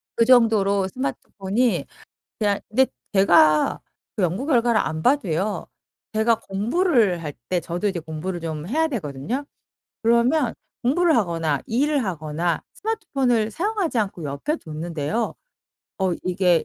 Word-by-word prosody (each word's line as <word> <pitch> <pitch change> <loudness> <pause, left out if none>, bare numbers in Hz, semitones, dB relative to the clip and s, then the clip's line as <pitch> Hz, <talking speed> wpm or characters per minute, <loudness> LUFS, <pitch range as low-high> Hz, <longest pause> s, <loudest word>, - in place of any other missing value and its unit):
그 230 - +4
정도로 215 -6 +4
스마트폰이 245 -2 -1 0.6
이야 205 -2 +2
근데 260 +5 +3 0.3
제가 170 -6 +4 0.4
그 205 - 0
연구 185 - 0
결과를 240 -6 +3
안 160 0 -2
봐도요. 205 - +1 0.5
제가 220 +1 +3
공부를 215 - +1
할 150 - -4 0.2
때 180 -1 +1
저도 175 +5 -2
이제 185 -3 -2
공부를 165 +3 -5
좀 160 -2 -5
해야 320 +7 +1
되거든요. 215 - -3 0.6
그러면 235 +4 +3 0.3
공부를 320 +6 +3
하거나 165 - 0
일을 285 +4 +1
하거나 165 -2 -2
스마트폰을 265 - 0
사용하지 375 - -1
않고 195 -6 -2
옆에 145 - -2
뒀는데요. 165 - -3 0.6
어 190 -2 +1
이게 180 -2 +2
205 Hz, 290 characters per minute, -23 LUFS, 170-250 Hz, 0.6 s, 그